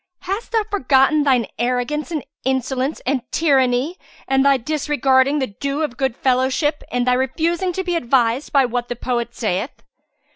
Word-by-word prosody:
Hast 395 +6 -4
thou 450 -2 +2
forgotten 280 -4 +3
thine 260 -5 +3
arrogance 250 +6 -1
and 310 -5 -4 0.2
insolence 265 +2 -1
and 265 0 0
tyranny, 270 +1 +2 0.3
and 270 0 +3
thy 275 -1 +4
disregarding 275 0 +1
the 270 - 0
due 280 +8 -3
of 290 -6 -3
goodfellowship 265 +3 0
and 245 0 0
thy 250 - +3
refusing 330 +8 0
to 380 - -2
be 355 -1 -1
advised 245 -2 +1
by 275 -2 +4
what 245 0 -2
the 245 - -3
poet 240 -1 -3
saith? 215 +2 -3
265 Hz, 155 wpm, -20 LUFS, 250-300 Hz, 0.3 s, thy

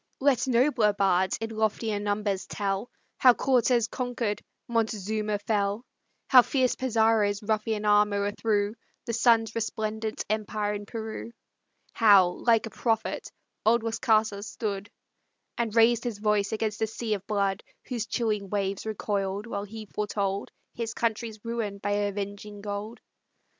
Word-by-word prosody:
Let 265 -3 +2
nobler 245 -4 +3
bards 190 -2 +2
in 225 0 -4
loftier 220 -1 0
numbers 205 -2 -1
tell 200 +2 -2 0.3
How 250 -2 +6
Cortez 245 -3 +2
conquer'd, 245 -5 -2 0.3
Montezuma 215 -2 -1
fell; 205 +2 -1 0.4
How 255 -2 +9
fierce 255 0 +1
Pizarro's 220 -4 +2
ruffian 215 0 -1
arm 210 0 +4
o'erthrew 205 +1 0 0.3
The 235 - -3
sun's 225 -1 +3
resplendent 220 -1 -3
empire 210 -1 -1
in 205 0 -6
Peru; 225 +1 -6 0.6
How, 200 -5 +6
like 225 +5 +2
a 225 - -7
prophet, 225 -2 -1 0.3
old 225 +1 +3
Las 225 -1 -2
Casas 215 -2 +2
stood, 205 -2 -4 0.7
And 230 -2 -2
raised 230 0 +5
his 240 -4 -3
voice 210 -1 +1
against 215 -1 -2
a 220 - +2
sea 225 0 -3
of 200 -1 -5
blood, 200 -1 0 0.2
Whose 235 -3 -3
chilling 210 -5 -1
waves 200 +1 -2
recoil'd 200 -1 -2
while 200 -3 -4
he 215 +1 -8
foretold 200 -1 -2 0.2
His 230 -1 -4
country's 225 -1 -2
ruin 230 -4 -3
by 205 +1 -3
avenging 205 0 -3
gold. 205 +2 -5
215 Hz, 135 wpm, -27 LUFS, 205-230 Hz, 0.7 s, How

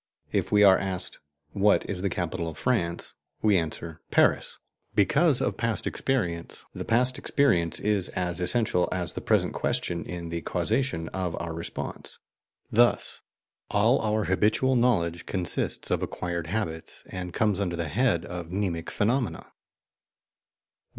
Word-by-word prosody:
If - - 0
we 105 0 +5
are 95 -2 +7
asked 95 -1 -4 0.3
"What 100 +3 +3
is 95 -3 -2
the 100 - 0
capital 85 -1 -3
of 80 - -6
France?" 85 -9 -1 0.3
we 105 -2 +5
answer 80 -1 -3
"Paris," - - +2 0.4
because 145 - +3
of - - -1
past 115 -2 -1
experience; 90 -11 -2
the - - -5
past 125 +3 +2
experience 85 -13 +2
is 100 -3 +1
as 90 -2 -1
essential 90 -1 +2
as 90 -3 -2
the - - -5
present - - +2
question 85 -1 -1
in 85 -1 -6
the 85 0 -3
causation 90 0 -1
of 90 -3 -3
our 85 -1 -4
response. 85 +1 -6 0.5
Thus 120 +2 +2 0.5
all 110 +6 +3
our 110 0 +1
habitual 105 +7 +2
knowledge 85 -9 +1
consists 90 -3 -1
of - - +1
acquired 85 -2 -3
habits, 80 -4 -4
and 90 -1 -6
comes 105 0 +1
under 90 -3 -1
the 85 -2 -2
head 110 - +1
of 90 -1 -6
mnemic 90 -3 -2
phenomena. 120 +3 -1
95 Hz, 145 wpm, -27 LUFS, 85-110 Hz, 0.5 s, are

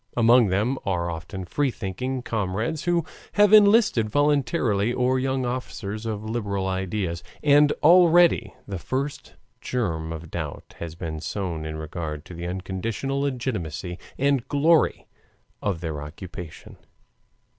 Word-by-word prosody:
Among 120 0 +6
them 105 +8 0
are 85 -3 -1
often 90 +3 -6
free 140 +10 0
thinking 125 +4 -4
comrades 110 - -2
who 175 -2 +2 0.3
have 205 0 +5
enlisted 210 - +6
voluntarily 120 -6 +2
or 125 +1 +1
young 130 0 0
officers 115 -3 -4
of 105 -1 -3
liberal 100 -4 -2
ideas, 95 -2 -2 0.2
and 145 0 +6
already 170 -6 +5
the 95 -3 -4
first 140 - -4 0.3
germ 80 -10 -2
of 80 0 -7
doubt 80 -4 -6
has 85 -1 -6
been 80 -2 -5
sown 85 -3 -4
in 80 - -5
regard 80 -1 -5
to - - -10
the 85 +1 -5
unconditional 95 +9 -3
legitimacy 105 - -3 0.2
and 140 -2 +1
glory 155 +3 +3 0.6
of 95 -5 -2
their 80 -4 -4
occupation. 85 +2 -9
110 Hz, 130 wpm, -25 LUFS, 90-135 Hz, 0.6 s, Among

